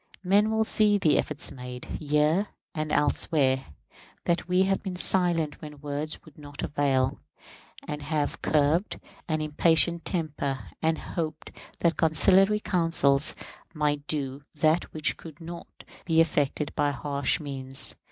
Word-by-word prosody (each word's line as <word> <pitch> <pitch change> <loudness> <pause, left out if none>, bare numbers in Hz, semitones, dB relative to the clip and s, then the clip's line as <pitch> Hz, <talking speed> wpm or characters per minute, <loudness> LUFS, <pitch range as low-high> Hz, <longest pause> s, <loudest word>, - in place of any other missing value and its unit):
Men 200 +3 +3
will 220 0 +2
see 210 -1 +3
the 155 -6 +3
efforts 150 +1 -2
made, 125 -2 -8
here 150 +6 +1 0.3
and 155 -1 -3
elsewhere; 140 -2 +2 0.6
that 170 +1 0
we 180 +1 +3
have 195 0 0
been 190 -3 -5
silent 175 -4 +3
when 150 -2 -10
words 145 +1 -5
would 155 -1 -17
not 145 -1 -8
avail, 135 -3 0 0.7
and 150 0 -5
have 145 0 -2
curbed 155 +6 +1 0.3
an 155 -1 -1
impatient 165 +2 +2
temper, 150 -6 -3
and 160 0 +1
hoped 155 -2 -5 0.3
that 170 -1 +2
conciliatory 195 +6 +4
counsels 165 -7 +1 0.4
might 150 -1 -1
do 140 -2 -1
that 155 +3 +1
which 155 -2 0
could 160 -3 -12
not 170 +1 -8 0.4
be 165 -2 +2
effected 150 -2 +1
by 145 -1 +1
harsh 140 0 -1
means. 135 -3 +1
155 Hz, 135 wpm, -27 LUFS, 145-170 Hz, 0.7 s, conciliatory